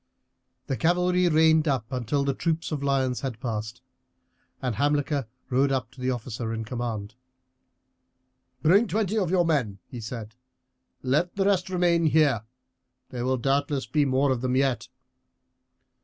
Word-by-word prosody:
The 135 Hz, -, -2 dB
cavalry 180 Hz, +1 st, +2 dB
reined 160 Hz, 0 st, +4 dB
up 130 Hz, -6 st, +1 dB
until 130 Hz, +2 st, -1 dB
the 140 Hz, -, +1 dB
troop 165 Hz, +3 st, -1 dB
of 150 Hz, -3 st, -2 dB
lions 135 Hz, -3 st, 0 dB
had 130 Hz, -5 st, -4 dB
passed. 110 Hz, -2 st, -4 dB, 0.8 s
Hamilcar 145 Hz, +1 st, 0 dB, 0.2 s
rode 135 Hz, +2 st, +3 dB
up 130 Hz, -3 st, -1 dB
to 130 Hz, -, -13 dB
the 130 Hz, -, 0 dB
officer 120 Hz, -2 st, -3 dB
in 110 Hz, 0 st, -4 dB
command. 110 Hz, -3 st, -4 dB, 1.5 s
"Bring 200 Hz, +9 st, +5 dB
twenty 215 Hz, 0 st, 0 dB
of 185 Hz, -5 st, 0 dB
your 180 Hz, -1 st, +3 dB
men," 130 Hz, -12 st, 0 dB
he 120 Hz, -, -8 dB
said; 110 Hz, -1 st, -7 dB, 0.7 s
"let 145 Hz, +7 st, +1 dB
the 195 Hz, -1 st, +1 dB
rest 190 Hz, -2 st, +2 dB
remain 175 Hz, -2 st, +2 dB
here. 150 Hz, -7 st, +3 dB, 0.7 s
There 125 Hz, -1 st, -4 dB
will 130 Hz, 0 st, +1 dB
doubtless 140 Hz, +2 st, 0 dB
be 150 Hz, -2 st, +1 dB
more 135 Hz, +1 st, +2 dB
of 125 Hz, -2 st, -1 dB
them 130 Hz, 0 st, 0 dB
yet." 135 Hz, -2 st, +1 dB
135 Hz, 145 wpm, -26 LUFS, 125-160 Hz, 1.5 s, Bring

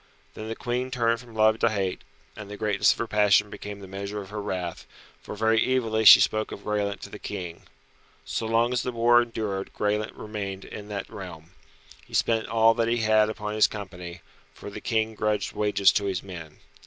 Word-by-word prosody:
Then 110 Hz, -, -7 dB
the 115 Hz, -, -4 dB
Queen 125 Hz, +2 st, -2 dB
turned 115 Hz, -2 st, +1 dB
from 120 Hz, -2 st, -14 dB
love 110 Hz, 0 st, +4 dB
to 115 Hz, -, +3 dB
hate, 100 Hz, -4 st, -2 dB, 0.3 s
and 105 Hz, -, -9 dB
the 105 Hz, -, -7 dB
greatness 105 Hz, -1 st, +3 dB
of -, -, -2 dB
her 115 Hz, -, -2 dB
passion 105 Hz, -1 st, +3 dB
became 100 Hz, -1 st, -8 dB
the 95 Hz, -, -9 dB
measure 100 Hz, +2 st, -5 dB
of 100 Hz, -1 st, -9 dB
her 105 Hz, 0 st, -4 dB
wrath, 90 Hz, -4 st, -4 dB, 0.3 s
for -, -, -8 dB
very 110 Hz, +1 st, +2 dB
evilly 110 Hz, -3 st, 0 dB
she -, -, +11 dB
spoke 110 Hz, 0 st, +1 dB
of 100 Hz, -, -8 dB
Graelent 105 Hz, -1 st, -2 dB
to -, -, -8 dB
the -, -, -9 dB
King. 85 Hz, -2 st, -7 dB, 0.6 s
So 70 Hz, +12 st, -3 dB
long 115 Hz, +2 st, +2 dB
as 125 Hz, -, +1 dB
the 125 Hz, -, -3 dB
war 120 Hz, 0 st, +5 dB
endured 110 Hz, -5 st, -4 dB
Graelent 105 Hz, +1 st, -1 dB
remained 100 Hz, -3 st, -6 dB
in 105 Hz, -1 st, -9 dB
that 100 Hz, -2 st, -5 dB
realm. 90 Hz, -4 st, -10 dB, 0.5 s
He -, -, -9 dB
spent 115 Hz, -1 st, +1 dB
all 115 Hz, 0 st, +4 dB
that 115 Hz, 0 st, 0 dB
he 120 Hz, 0 st, +1 dB
had 110 Hz, 0 st, +4 dB
upon 105 Hz, -1 st, -4 dB
his 110 Hz, 0 st, +5 dB
company, 90 Hz, -4 st, -8 dB, 0.3 s
for 100 Hz, -, -9 dB
the 105 Hz, -, -8 dB
King 110 Hz, -1 st, 0 dB
grudged 105 Hz, -1 st, -1 dB
wages 105 Hz, -2 st, +3 dB
to 100 Hz, -, 0 dB
his 95 Hz, -2 st, -2 dB
men. 85 Hz, -5 st, -9 dB
105 Hz, 205 wpm, -26 LUFS, 100-110 Hz, 0.6 s, she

